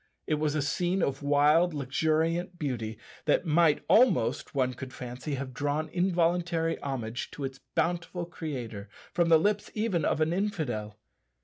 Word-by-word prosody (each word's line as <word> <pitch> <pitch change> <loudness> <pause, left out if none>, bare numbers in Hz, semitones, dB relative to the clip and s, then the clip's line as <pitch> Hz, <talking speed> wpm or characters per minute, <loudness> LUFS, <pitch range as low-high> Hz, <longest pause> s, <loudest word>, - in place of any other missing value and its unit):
It 155 -1 0
was 155 -1 0
a 150 - +1
scene 175 +5 0
of 135 0 -1
wild, 150 +4 +4
luxuriant 160 +6 0
beauty, 115 -8 -3 0.3
that - - +2
might 160 -1 +3
almost 215 - +3
(one 130 -2 +1
could 130 +1 -8
fancy) 125 +4 -5
have 130 -1 -5
drawn 145 +3 -1
involuntary 175 -1 +1
homage 125 -4 -4
to 145 - -8
its 135 0 -5 0.2
bountiful 175 +1 -1
Creator 125 - -6 0.2
from 170 -1 +2
the 165 - +8
lips 205 +5 0
even 210 -7 0
of 155 - +1
an 160 +1 +2
infidel. 145 - -2
155 Hz, 150 wpm, -29 LUFS, 135-175 Hz, 0.3 s, the